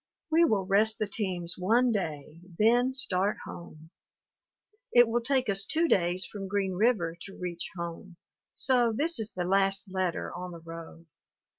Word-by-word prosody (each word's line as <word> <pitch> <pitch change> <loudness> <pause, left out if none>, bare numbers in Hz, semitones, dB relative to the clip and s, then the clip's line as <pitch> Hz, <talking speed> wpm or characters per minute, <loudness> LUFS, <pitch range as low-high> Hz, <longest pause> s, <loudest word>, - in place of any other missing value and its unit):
We 335 +2 +5
will 205 - +1
rest 215 +3 +3
the 215 - -1
teams 185 -4 -3
one 235 +7 +3
day, 155 -6 -4 0.2
then 245 +4 +3
start 200 -5 +1
home. 160 -1 -11 1.0
It 240 -1 +6
will 235 +1 0
take 260 +1 0
us 195 -1 +1
two 325 +10 +1
days 180 - +1
from 195 -2 -7
Green 195 -1 -1
River 185 -5 +1
to 195 - -9
reach 175 -1 -5
home, 170 +1 -7 0.4
so 245 -3 +3
this 300 +5 +1
is 215 -1 -4
the 180 - -2
last 195 +1 +1
letter 185 -2 -2
on 180 0 -6
the 170 - -9
road. 165 0 -10
195 Hz, 160 wpm, -29 LUFS, 175-230 Hz, 1.0 s, It